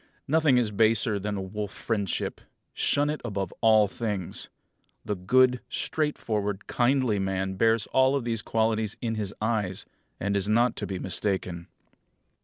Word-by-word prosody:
Nothing 150 -3 +4
is 115 -4 +1
baser 110 0 +3
than 100 -1 -4
wolf 105 -2 -3
friendship. 105 -5 -2 0.3
Shun 145 +1 +2
it 150 - -5
above 100 -6 -3
all 110 -2 +5
things. 100 -4 -3 0.6
The 105 - -1
good, 125 +7 +3
straightforward, 110 -12 -2
kindly 125 -4 +1
man 95 0 -1
bears 115 +2 +2
all 130 +1 +4
these 115 -3 -1
qualities 110 -1 0
in 115 -2 -2
his 105 -3 -2
eyes, 105 -4 -1 0.3
and 100 +1 -1
is 100 +1 0
not 120 +2 +3
to - - -3
be 95 - -3
mistaken. 90 -2 -2
110 Hz, 140 wpm, -27 LUFS, 100-120 Hz, 0.6 s, all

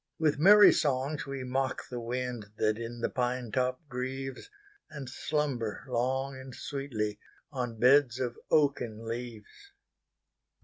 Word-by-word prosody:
With 155 -3 +1
merry 205 +5 +9
songs 140 +1 0
we 135 -1 -4
mock 130 +1 -2
the 125 - -6
windThat 115 -3 -2
in 115 0 -6
the - - +2
pine 125 -2 -1
top 130 +4 -1
grieves, 135 - -5 0.4
And 150 -4 -7
slumber 130 -4 -2
long 130 +2 0
and 130 -1 -9
sweetlyOn 120 -1 -5
beds 130 0 +5
of 125 -2 -2
oaken 125 -7 +1
leaves. 120 - -7
130 Hz, 120 wpm, -30 LUFS, 120-140 Hz, 0.4 s, merry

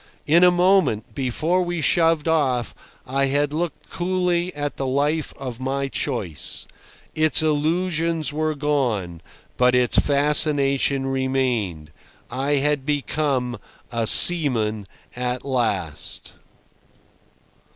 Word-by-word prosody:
In 165 +4 +4
a 180 - +8
moment, 175 - +1
before 155 +7 -1
we 175 -1 -3
shoved 165 0 +2
off, 135 -7 0 0.3
I 135 +2 0
had 145 +1 0
looked 165 0 -4
coolly 180 -1 -1
at 145 0 -4
the 135 - -3
life 145 +4 -1
of 130 -4 -7
my 135 +1 -2
choice. 110 - -4 0.5
Its 155 0 +2
illusions 160 +1 0
were 155 0 -1
gone, 120 - -2 0.4
but 125 0 +3
its 125 -1 +3
fascination 140 -2 +1
remained. 130 - -2 0.4
I 135 +4 -1
had 145 0 0
become 140 -4 -2 0.3
a 115 -2 -1
seaman 115 - +5 0.3
at 125 +1 -3
last. 100 - -3
140 Hz, 110 wpm, -22 LUFS, 125-155 Hz, 0.5 s, a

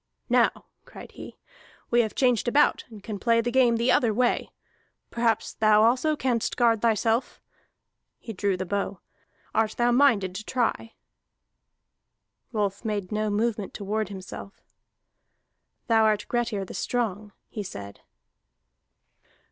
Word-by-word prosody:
"Now," - - +2 0.2
cried - - -12
he, - - -11 0.5
"we 240 0 +5
have 220 -2 -3
changed 250 -3 +2
about, 280 +5 +3
and 215 -4 -12
can 210 -2 -5
play 230 +1 +3
the 235 +1 -1
game 245 -2 +4
the 235 +2 +2
other 235 -3 +3
way. 240 +3 0 0.6
Perhaps 230 -2 0
thou 215 0 +4
also 255 +7 +2
canst 250 -5 -1
guard 230 -3 +3
thyself." 225 +1 +1 0.8
He 225 - -8
drew 195 -1 -1
the 185 - -3
bow. 200 0 -3 0.5
"Art 220 0 +1
thou 240 0 +3
minded 235 -8 +3
to 195 +3 -6
try?" 230 -1 -2 1.6
Rolf 205 -3 -2
made 205 -4 -3
no 215 0 -1
movement 210 -1 -1
to 205 - -6
ward 210 0 -2
himself. 195 0 -9 1.2
"Thou 225 -1 +3
art 210 -1 +2
Grettir 235 -5 -1
the - - -10
Strong," 215 -4 -2 0.2
he 215 - -6
said. 100 - -9
220 Hz, 135 wpm, -26 LUFS, 205-240 Hz, 1.6 s, we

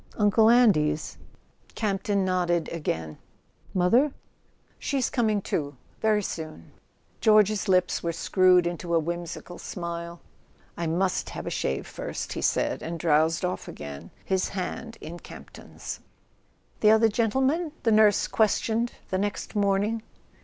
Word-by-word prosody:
"Uncle 220 +1 +4
Andy's?" 160 -11 +3 0.6
Campton 200 -2 0
nodded 175 -2 +1
again. 80 - -4 0.5
"Mother 230 +11 +3 0.3
?" - - -38
"She's 270 -3 -1
coming 215 -5 +1
too—very 170 - -1
soon." 155 - -6 0.5
George's 215 -1 +4
lips 185 -1 +2
were 170 - -1
screwed 180 +1 +4
into 170 0 -2
a - - +5
whimsical 170 +2 -5
smile. 170 -1 -6 0.6
"I 170 - -3
must 180 +3 0
have - - -6
a - - -3
shave 65 - -2
first," - - -5
he - - -4
said, - - 0
and 170 +1 -4
drowsed 160 +1 +2
off 180 - -3
again, 75 +2 -8 0.2
his 190 -1 0
hand 225 +4 -5
in 170 +2 -8
Campton's... - - -9 0.8
"The 215 - +5
other 220 +1 +6
gentleman—?" 265 +9 +1
the 225 - +3
nurse 215 -1 +5
questioned 225 +2 +1 0.2
the 185 - +1
next 205 +2 -3
morning. 205 +2 +1
185 Hz, 130 wpm, -26 LUFS, 170-215 Hz, 0.8 s, other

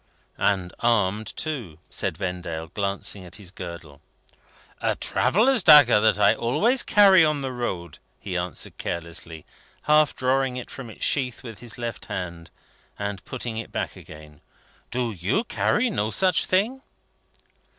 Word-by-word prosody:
"And 95 -3 0
armed 110 -2 +1
too," 130 - -4
said 95 -5 -3
Vendale, 90 -4 -4
glancing 100 +2 -3
at 90 - -11
his 100 -4 -10
girdle. 85 -6 -9 0.8
"A - - +1
traveller's 235 +5 +2
dagger, 145 -9 +8
that 110 0 +3
I 105 - +5
always 210 - +1
carry 195 -4 +6
on 150 -2 +1
the 135 -1 -3
road," 90 - -4 0.2
he 95 -3 -6
answered 90 -3 -3
carelessly, 85 -1 -5 0.4
half 150 -1 +4
drawing 130 0 0
it 125 - -7
from 130 -4 -8
its 110 - -4
sheath 130 -4 0
with 115 -4 -9
his 120 -2 -6
left 120 -2 -5
hand, 85 -3 -6 0.5
and 100 -4 -4
putting 115 -2 -5
it 115 - -6
back - - -3
again. 75 -1 -13 0.5
"Do 120 -1 -1
you 100 - -1
carry 240 +1 +1
no 110 - -1
such 185 +7 +2
thing?" 220 +8 +1
110 Hz, 145 wpm, -24 LUFS, 90-135 Hz, 0.8 s, dagger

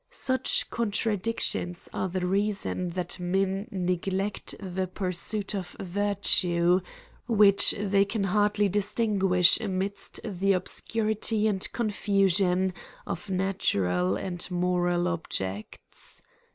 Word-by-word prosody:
Such 260 - 0
contradictions 210 -5 -1
are 190 - -2
the 180 0 -2
reason 195 -1 -1
that 180 0 -3
men 195 +3 -1
neglect 190 +2 -2
the 190 -1 -3
pursuit 190 +3 -2
of 190 -3 -5
virtue, 185 -2 +2 0.5
which 205 -3 +5
they 200 -1 +3
can 200 +1 -2
hardly 205 +1 +2
distin 205 +2 0
guish 180 +2 +5
amidst 195 0 -3
the 195 -2 0
obscuiity 215 +3 -1
and 195 -3 -1
confusion 195 -4 +1 0.3
of 175 - -5
natu 190 - 0
ral 90 +1 +1
and 175 - -4
moral 175 -1 0
objects. 105 - -5
195 Hz, 105 wpm, -27 LUFS, 180-205 Hz, 0.5 s, which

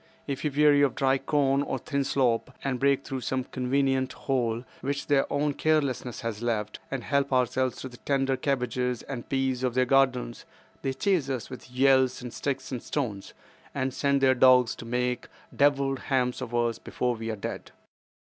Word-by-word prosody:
If 140 -2 -4
we 150 - +1
weary 145 0 +4
of 140 -4 +2
dry 135 0 +2
corn 140 0 +2
or 140 -2 -2
thin 140 +2 -2
slop, 130 -2 0
and 135 -2 -1
break 140 0 +2
through 130 -1 -5
some 130 +1 -1
convenient 130 +1 0
hole 120 -3 -1 0.2
which 140 +1 -3
their 140 -2 +2
own 145 0 +1
carelessness 140 -6 0
has 115 -2 -4
left, 110 -3 -2
and 135 -3 -4
help 140 -1 0
ourselves 130 0 +1
to - - -5
the 125 -1 -12
tender 135 0 0
cabbages 125 -2 -1
and 125 -4 -7
peas 135 -2 0
of 125 -2 0
their 130 0 +3
gardens, 125 -2 +1 0.4
they 135 - -1
chase 160 -1 +1
us 130 -4 -4
with 130 - -9
yells 130 0 +3
and 125 -1 -8
sticks 135 -2 -3
and 125 -3 -3
stones, 110 -9 -4 0.4
and 130 -1 -1
send 140 0 +1
their 130 -1 +5
dogs 125 -1 +5
to - - -8
make 125 +1 -1 0.3
devilled 140 -1 +2
ham 125 -2 0
of 120 - -4
us 120 -1 0
before 125 -1 -2
we 115 -1 -5
are 110 - -2
dead." 100 - -6
130 Hz, 185 wpm, -27 LUFS, 125-140 Hz, 0.4 s, their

